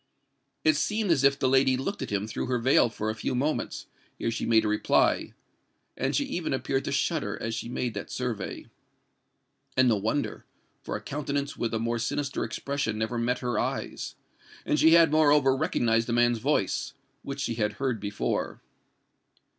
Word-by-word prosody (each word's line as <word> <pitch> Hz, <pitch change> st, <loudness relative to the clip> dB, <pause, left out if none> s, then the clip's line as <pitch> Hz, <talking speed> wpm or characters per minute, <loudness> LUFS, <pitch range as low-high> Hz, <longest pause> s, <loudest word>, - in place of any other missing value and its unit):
It 155 Hz, -, +5 dB
seemed 210 Hz, +3 st, 0 dB
as 140 Hz, -5 st, +3 dB
if 140 Hz, 0 st, +5 dB
the 130 Hz, -, +1 dB
lady 130 Hz, 0 st, +4 dB
looked 195 Hz, +10 st, -3 dB
at -, -, -4 dB
him 100 Hz, 0 st, -1 dB
through 110 Hz, -, -4 dB
her 125 Hz, 0 st, +1 dB
veil 120 Hz, 0 st, +4 dB
for 110 Hz, -1 st, -3 dB
a -, -, -6 dB
few 110 Hz, -, -2 dB
moments, 145 Hz, +5 st, -1 dB, 0.3 s
ere 115 Hz, -, -1 dB
she 115 Hz, -, -3 dB
made 110 Hz, -1 st, +4 dB
a -, -, +1 dB
reply; 105 Hz, 0 st, +2 dB, 0.6 s
and -, -, -1 dB
she -, -, +1 dB
even -, -, -2 dB
appeared -, -, -1 dB
to -, -, -2 dB
shudder -, -, 0 dB
as 115 Hz, -, -3 dB
she 115 Hz, +1 st, -4 dB
made 120 Hz, -1 st, -2 dB
that 100 Hz, -, -6 dB
survey. 120 Hz, -6 st, -4 dB, 1.1 s
And 130 Hz, 0 st, +5 dB
no 115 Hz, -3 st, +3 dB
wonder;—for 110 Hz, +8 st, -4 dB
a -, -, -11 dB
countenance 145 Hz, -1 st, -3 dB
with 115 Hz, -, -2 dB
a 115 Hz, -, 0 dB
more 115 Hz, +1 st, -1 dB
sinister 140 Hz, +4 st, -2 dB
expression 140 Hz, -6 st, -2 dB
never 110 Hz, +2 st, -2 dB
met 125 Hz, +2 st, 0 dB
her 120 Hz, -3 st, 0 dB
eyes; -, -, -3 dB, 0.5 s
and 150 Hz, -, +1 dB
she 160 Hz, +1 st, +6 dB
had 165 Hz, -3 st, +6 dB
moreover 145 Hz, -3 st, +4 dB
recognised 115 Hz, -6 st, +1 dB
the 120 Hz, -, -1 dB
man's 120 Hz, -1 st, +3 dB
voice, -, -, 0 dB, 0.3 s
which 140 Hz, 0 st, -5 dB
she 120 Hz, -, -1 dB
had 105 Hz, -2 st, -1 dB
heard 125 Hz, 0 st, -2 dB
before. 100 Hz, 0 st, -2 dB
125 Hz, 180 wpm, -27 LUFS, 115-140 Hz, 1.1 s, she